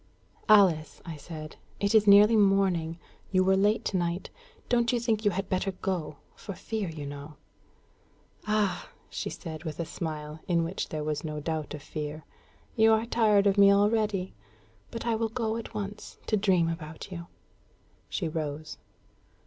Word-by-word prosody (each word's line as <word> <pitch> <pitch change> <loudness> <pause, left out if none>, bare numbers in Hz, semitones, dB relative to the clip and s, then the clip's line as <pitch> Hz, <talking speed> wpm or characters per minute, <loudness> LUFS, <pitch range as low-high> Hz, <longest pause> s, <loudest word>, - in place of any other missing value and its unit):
"Alice," 185 -7 +5
I 165 -3 -6
said, 155 +1 -9 0.2
"it 200 +1 +1
is 215 -1 +5
nearly 205 +3 +8
morning. 195 -5 +2 0.3
You 185 -1 +4
were 190 +1 +4
late 205 +3 +2
to 190 - 0
night. 175 +1 -2 0.4
Don't 235 -1 +2
you 245 - +1
think 225 -2 0
you - - +6
had 195 0 -3
better 190 +1 -1
go 180 -5 -3 0.2
for 200 - -8
fear, 215 -1 -3
you 155 -3 -6
know?" 145 +1 -8 1.1
"Ah!" 205 -4 0 0.2
she - - -3
said, 160 -3 -7
with 155 -2 -6
a 170 - -1
smile, 155 -2 -5
in 170 -2 +2
which 170 +4 -3
there 155 -1 -3
was 150 -1 -2
no 155 -1 -4
doubt 155 -1 -3
of 145 - -10
fear, 150 0 -6 0.5
"you 220 -1 +5
are 220 +1 +3
tired 215 -4 +3
of 200 0 +3
me 200 0 +8
already! 205 -2 +2 0.6
But 230 0 -6
I 235 - +1
will 225 0 0
go 225 -1 -2
at 230 -1 -7
once 205 0 -6
to 215 - +1
dream 190 -5 +3
about 165 +1 -6
you." 170 -1 -7 0.8
She 175 - -2
rose. 155 -1 -4
185 Hz, 170 wpm, -28 LUFS, 160-210 Hz, 1.1 s, nearly